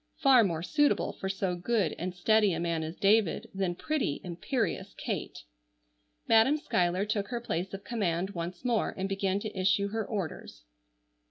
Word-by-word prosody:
Far 260 -4 +6
more 170 -5 -1
suitable 295 - +2
for 190 - -5
so 190 -2 -1
good 195 +1 0
and 180 +1 -4
steady 210 +2 +3
a 165 - -2
man 170 -1 -1
as 160 +2 -5
David 205 -2 +2
than 190 -2 -1
pretty, 285 - -1
imperious 180 - -2
Kate. - - -4 0.8
Madam 225 +7 +5
Schuyler 180 - 0
took 210 -1 -1
her 240 +1 -3
place 185 -5 -3
of 195 0 -7
command 190 -5 -1
once 175 +4 -6
more 235 -3 +1
and 190 0 -1
began 195 0 0
to 215 -1 -6
issue 190 +2 +2
her 220 +1 -2
orders. 175 - -5
195 Hz, 165 wpm, -30 LUFS, 175-220 Hz, 0.8 s, Far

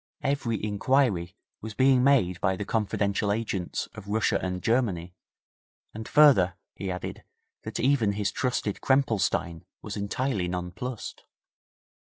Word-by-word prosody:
Every 135 -5 0
inquiry 105 -4 +1 0.3
was 110 -1 -7
being 130 -1 +4
made 100 -10 +3
by 95 -1 +2
the 100 - -5
confidential 100 -1 0
agents 100 -5 -2
of 105 -2 -10
Russia 105 +1 +1
and 90 0 -3
Germany, 100 -8 0 0.8
and 110 0 -7
further, 125 -13 +5 0.2
he 95 - -5
added, 90 0 -5 0.4
that - - -4
even 125 -6 +2
his 100 -1 -1
trusted 125 -5 -2
Krempelstein 105 -10 +1 0.2
was 105 - -5
utterly 100 -1 -1
nonplussed.' 90 +7 -5
105 Hz, 125 wpm, -27 LUFS, 95-125 Hz, 0.8 s, further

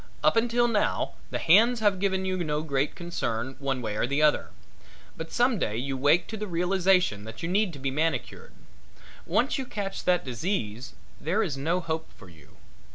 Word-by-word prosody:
Up - - +4
until 240 +1 +3
now 215 -3 0 0.2
the - - -2
hands 225 +8 +5
have 205 -3 +2
given 190 -1 0
you 185 -1 -1
no 150 -1 -1
great 140 -2 -1
concern 130 -8 -3
one 135 -3 -2
way 105 -2 -3
or 115 - 0
the 140 +3 0
other, 150 -1 +3 0.7
but 160 0 -7
some 240 -3 +2
day 105 -7 -1
you 135 +3 -2
wake 145 +6 +3
to 220 - -5
the 210 0 -4
realization 180 - +2
that 110 +6 -9
you - - -1
need 195 +2 +1
to - - -8
be 135 0 -2
manicured. 160 +4 -2 0.8
Once - - +1
you 265 - -3
catch 195 -3 -4
that 180 -4 +2
disease 125 - -3 0.3
there 185 +8 0
is 165 -9 -2
no 160 +6 0
hope 160 -1 -3
for 95 - -14
you. 80 -4 -19
165 Hz, 190 wpm, -27 LUFS, 135-195 Hz, 0.8 s, hands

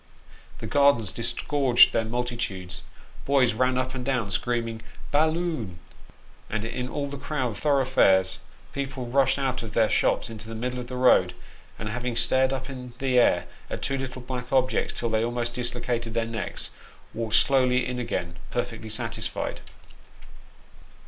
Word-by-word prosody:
The - - -7
gardens 120 -4 +3
disgorged 130 +1 +3
their 115 - +2
multitudes, 115 -6 -3 0.4
boys 135 -4 +3
ran 130 +3 +2
up 130 0 -1
and 130 -1 -4
down 125 -6 -1
screaming 115 +1 -1 0.2
" - - -14
bal 155 +2 +4
loon; 155 - -3 0.4
" - - -27
and 110 0 -2
in 125 +2 -3
all 145 +1 -2
the 140 -1 -7
crowded 130 -7 -2
thoroughfares 130 -9 +3 0.3
people 135 -2 -4
rushed 135 +2 +2
out 130 -2 -1
of 110 -2 -7
their 110 -2 +3
shops - - +2
into 110 -1 -8
the 115 - -5
middle 125 +3 -3
of 125 - -6
the 125 - -6
road, 125 0 +4 0.4
and 105 - -5
having 125 +2 -3
stared 130 +2 +3
up 130 -1 -3
in 125 -3 -8
the 130 -1 +3
air 120 - +4 0.2
at - - -4
two 135 - +1
little 130 -1 -5
black 125 -1 -5
objects 130 -3 +1
till 120 - -1
they 110 0 +2
almost 120 0 -2
dislocated 120 -1 -2
their 115 -1 +1
necks, 115 0 -3 0.4
walked 110 -1 -1
slowly 125 -2 +4
in 125 0 -3
again, 85 -8 -3
perfectly 115 -2 -3
satisfied. 105 - -3
125 Hz, 160 wpm, -26 LUFS, 115-130 Hz, 0.4 s, bal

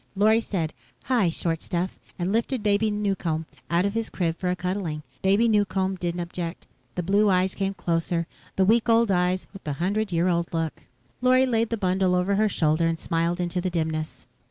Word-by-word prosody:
Lorry 215 +3 +4
said. 170 -8 -2 0.3
"Hi, 235 -9 +2
short 165 0 -1
stuff," 180 +1 -3 0.2
and 175 +1 -1
lifted 235 +1 0
Baby 210 +1 +2
Newcomb 195 -6 -1
Male, - - -25 0.2
out 180 - +3
of 200 - 0
his 225 0 -2
crib 165 -3 -1
for 180 +1 -2
a 180 - +1
cuddling. 180 -4 -3 0.2
Baby 200 +5 +4
Newcomb 195 -3 +1
didn't 175 -1 -3
object. 170 0 -5 0.3
The 180 - -2
blue 200 +4 +3
eyes 185 0 +2
came 195 0 -2
closer. 170 -1 -1 0.3
The 190 - +3
week 230 +3 +3
old 230 -2 +4
eyes 180 0 +1
with 195 - -11
the 150 - -2
hundred 200 +7 -1
year 170 +1 +2
old 170 -1 0
look. 165 -1 -3 0.3
Lorry 255 +1 +5
laid 230 -3 +1
the 230 - -1
bundle 185 -2 +2
over 180 +2 +1
her 215 0 +3
shoulder 160 -2 +2
and 165 -1 -1
smiled 170 +2 -1
into 180 0 -1
the 185 - -1
dimness. 160 -2 -3
185 Hz, 200 wpm, -25 LUFS, 170-205 Hz, 0.3 s, Lorry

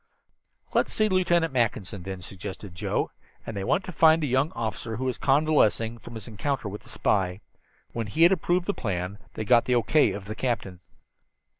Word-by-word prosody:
"Let's - - +2
see 215 - +2
Lieutenant 175 -5 +2
Mackinson, 110 -5 -1
then," 95 0 -6
suggested 95 +1 -8
Joe, 90 - -1 0.3
and 115 - -6
they 100 - -3
went 165 - +1
to 185 - -6
find 160 -1 +5
the 150 - -1
young 130 +4 +1
officer 115 0 -4
who 130 - -4
was 130 -2 -2
convalescing 135 -6 +2
from 120 - -11
his 110 -3 -8
encounter 120 +2 -2
with 105 +1 -6
the 120 - -16
spy. 95 -4 0 0.5
When 115 -2 -3
he 155 +11 +2
had 170 - +7
approved 175 0 +1
the 205 - 0
plan 95 - -3 0.2
they 110 - -3
got 120 +2 +5
the 125 - +2
O. 120 - +3
K. 155 -1 +4
of 100 -1 -7
the 105 - -5
captain. 110 -6 -2
115 Hz, 195 wpm, -26 LUFS, 100-150 Hz, 0.5 s, had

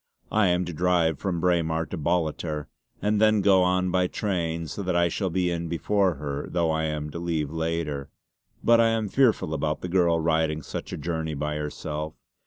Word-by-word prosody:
I 105 -2 +3
am 90 0 +2
to 85 - -5
drive 85 -2 +2
from 95 -4 -1
Braemar 80 -2 +1
to - - -2
Ballater 80 -2 -1 0.4
and 105 0 +2
then 110 -1 +5
go 95 -1 +5
on 90 0 +2
by 90 0 +2
train 85 -5 -2
so 80 +6 -5
that 90 -2 -1
I 85 0 +3
shall 95 +3 -1
be 90 0 0
in 85 0 -2
before 95 +2 +1
her, 70 0 -4
though 85 -2 +1
I 80 0 0
am 75 -1 -3
to 85 - -5
leave 80 -4 -2
later. 80 -3 -2 0.5
But 115 0 +6
I 115 - +5
am 115 -2 0
fearful 115 - +2
about 75 0 -1
the - - -3
girl 85 -2 +3
riding 80 -1 +1
such - - -6
a - - -4
journey 80 -2 -3
by 75 +1 -2
herself. 75 +1 -4
85 Hz, 195 wpm, -26 LUFS, 80-90 Hz, 0.5 s, But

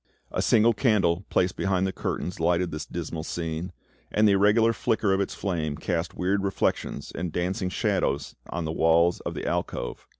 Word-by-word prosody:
A - - -1
single 115 +1 +4
candle 100 -6 +2
placed 90 +1 +1
behind 95 -1 +1
the 95 - 0
curtains 90 -1 -4
lighted 85 +1 +1
this 75 -1 -5
dismal 85 -2 -5
scene, 85 +1 -4 0.4
and 105 +1 +3
the - - +5
irregular 105 +4 +4
flicker 105 -1 +1
of 95 - +2
its 100 - -3
flame 80 -7 -2
cast 85 -2 -2
weird 95 +2 0
reflections 100 -1 -1
and 85 0 -3
dancing 90 +3 -1
shadows 70 -5 -1 0.2
an 85 -1 -2
the 80 - -2
walls 80 +2 +3
of - - -5
the - - -4
alcove. - - -3
90 Hz, 175 wpm, -26 LUFS, 85-100 Hz, 0.4 s, the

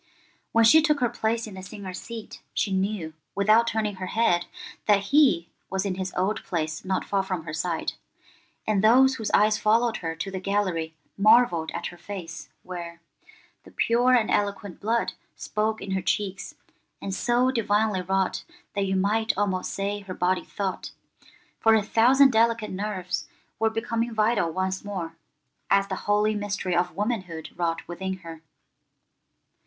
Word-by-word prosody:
When 230 - +4
she 315 +8 +8
took 300 -2 +2
her 245 -2 +2
place 230 0 -1
in 215 - -9
the 190 - -8
singers' 190 -2 -7
seat 230 -2 -9
she 195 - 0
knew, 190 -4 -1 0.2
without 215 +4 +4
turning 215 -3 -1
her 185 0 -5
head, 180 -5 +1 0.4
that 200 0 +3
he 260 - +5 0.2
was 190 +1 -1
in 195 - 0
his 185 0 -4
old 190 +4 0
place 155 -3 -3
not 190 0 -1
far 200 -1 +1
from 185 -4 -4
her 155 - -6
side, 165 +1 -2 0.7
and 210 -2 +1
those 260 +4 +6
whose 220 - -3
eyes 215 +1 +3
followed 225 +2 +2
her 165 -1 -4
to 195 +4 -5
the 190 - -4
gallery 185 -5 -1 0.2
marvelled 215 -6 +5
at - - -4
her 175 - -15
face, 175 -4 -7
where— 170 -2 -7 0.6
'The - - -14
pure 245 +2 +3
and 225 -3 +2
eloquent 200 -2 -1
blood 230 +3 0 0.2
Spoke 215 +1 -2
in 195 - -5
her 190 0 0
cheeks, 200 +2 -2 0.4
and 195 - -4
so 245 +5 +2
divinely 215 -4 +1
wrought 190 +1 0 0.3
That 200 -1 0
you 190 - 0
might 210 +3 +1
almost 195 -2 0
say 200 +1 -2
her 195 -2 -8
body 180 +1 +1
thought;' 195 -2 -4 0.7
for 225 0 +5
a 215 - +2
thousand 260 +6 +5
delicate 230 -1 +2
nerves 190 -2 -3 0.3
were 225 - +3
becoming 225 +1 -2
vital 215 -5 +2
once 185 +2 -2
more, 180 -5 -5 0.5
as 195 0 +3
the 190 - -1
holy 210 +1 +3
mystery 200 -3 -2
of 175 -1 0
womanhood 190 -6 -3
wrought 165 -1 -2
within 190 +2 -4
her. 165 -1 -8
200 Hz, 165 wpm, -26 LUFS, 185-220 Hz, 0.7 s, she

